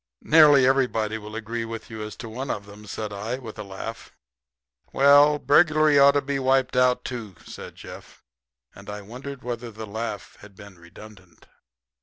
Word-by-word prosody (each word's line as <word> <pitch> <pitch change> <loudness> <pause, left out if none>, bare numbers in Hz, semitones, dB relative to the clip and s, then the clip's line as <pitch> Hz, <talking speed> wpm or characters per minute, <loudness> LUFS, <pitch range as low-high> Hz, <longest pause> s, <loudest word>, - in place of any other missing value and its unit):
"Nearly 150 -4 +6
everybody 115 -5 +1
will 105 +1 -10
agree 115 +1 -4
with 115 0 -8
you 110 -1 -7
as 105 0 -7
to 115 - -9
one 125 +5 -6
of 100 - -4
them," 105 +1 -14
said 105 +1 -5
I, 110 +5 -4
with 115 -4 -10
a - - -4
laugh. 100 +3 -8 0.8
"Well, 145 +2 +5
burglary 155 0 +4
ought 140 0 +7
to 145 - 0
be 140 0 -2
wiped 130 -1 +1
out, 125 0 +2
too," 115 -7 -6
said - - -10
Jeff; - - -13 0.5
and - - -13
I 105 0 -7
wondered 130 +5 -9
whether 120 -1 -5
the 110 0 -8
laugh 110 0 -6
had 100 -1 -15
been 100 -3 -14
redundant. 95 0 -16
115 Hz, 175 wpm, -24 LUFS, 105-135 Hz, 0.8 s, ought